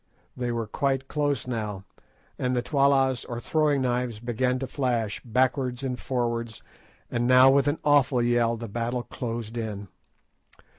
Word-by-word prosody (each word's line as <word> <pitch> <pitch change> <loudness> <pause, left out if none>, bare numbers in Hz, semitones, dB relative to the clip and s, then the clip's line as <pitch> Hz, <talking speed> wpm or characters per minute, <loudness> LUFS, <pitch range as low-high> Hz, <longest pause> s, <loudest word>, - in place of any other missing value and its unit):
They 125 -1 -2
were 115 -1 -2
quite 135 +3 -1
close 145 -2 -1
now, 105 -6 -4 0.6
and 125 0 0
the 120 - 0
tollas, 135 -3 +2
or 120 -2 -5
throwing 145 +1 +1
knives, 125 -3 -1
began 125 +2 0
to 135 - -3
flash 120 -6 -1
backwards 130 +1 0
and 125 -2 -3
forwards, 115 -3 -2 0.5
and 120 0 0
now 130 +1 +7
with 140 0 +3
an 145 +2 +1
awful 140 -3 +4
yell 120 -1 +2
the 115 +1 -6
battle 120 +3 -2
closed 115 -2 -5
in. 105 -4 -5
125 Hz, 150 wpm, -26 LUFS, 115-135 Hz, 0.6 s, now